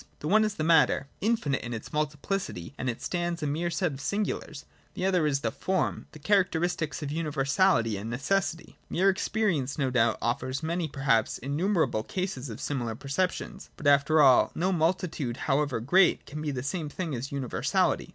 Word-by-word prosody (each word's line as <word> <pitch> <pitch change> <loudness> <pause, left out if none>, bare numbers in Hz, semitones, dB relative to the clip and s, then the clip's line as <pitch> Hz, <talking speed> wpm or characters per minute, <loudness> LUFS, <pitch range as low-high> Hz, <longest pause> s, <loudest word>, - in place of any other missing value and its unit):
The 150 - -6
one 215 +6 +5
is 215 -1 -1
the 155 - -2
matter, 160 -3 +4 0.2
infinite 210 -11 0
in 120 0 -5
its 110 - -8
multiplicity, 150 - -3
and 130 - -2
as 120 - -1
it - - -21
stands 175 -2 -2
a - - 0
mere 160 +4 -1
set 170 0 0
of 135 - -8
singulars: 200 -5 -3 0.3
the 185 - -2
other 180 -5 +2
is 140 -2 0
the - - -1
form, 190 -1 -1
the - - -11
characteristics 175 -4 0
of 145 - -4
universality 145 - +1
and 105 +3 -5
necessity. 165 +7 -2
Mere 195 +3 +3
experience 190 -9 -1
no 135 -3 0
doubt 115 -3 +2
offers 130 +4 -2
many, 170 +1 -1
perhaps 135 -6 +1
innumerable 160 - 0
cases 160 - -4
of 110 - -7
similar 120 -6 -2
perceptions: 145 +9 -3
but, - - -10
after 145 +2 +4
all, 130 -3 +6
no 185 +3 +1
multitude, 165 -7 0
however 140 -3 +1
great, 180 +11 +3
can 150 +2 -7
be 155 - -2
the 130 -3 -3
same 155 +1 -3
thing 165 0 -4
as 130 +2 -4
universality. 135 -3 0
150 Hz, 180 wpm, -28 LUFS, 135-180 Hz, 0.3 s, all